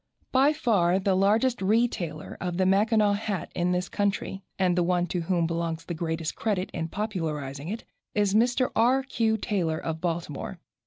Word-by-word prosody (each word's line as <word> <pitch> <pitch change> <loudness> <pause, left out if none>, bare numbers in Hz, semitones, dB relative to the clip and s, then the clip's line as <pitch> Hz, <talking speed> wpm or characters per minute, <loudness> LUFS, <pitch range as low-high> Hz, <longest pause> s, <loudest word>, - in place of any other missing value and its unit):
By 270 +3 +5
far 210 - +2
the 195 0 +1
largest 215 +6 +2
retailer 190 -7 0
of 180 -1 -2
the 185 - +2
Mackinaw 210 +2 +3
hat 205 -3 -3
in 175 +1 0
this 180 0 0
country, 200 -1 -1 0.2
and 185 -2 +2
the 180 - +2
one 175 0 +2
to 175 0 -2
whom 170 0 +1
belongs 165 0 -2
the 175 - -4
greatest 160 -1 -2
credit 200 -4 -1
in 165 -1 -2
popularizing 160 -9 -3
it, 220 +5 -4 0.3
is 205 -2 +2
Mr. 245 +3 +3
R. 250 +4 +4
Q. 225 -4 +1
Taylor, 180 -7 -1
of 160 0 -4
Baltimore. 170 0 -3
190 Hz, 170 wpm, -27 LUFS, 170-215 Hz, 0.3 s, By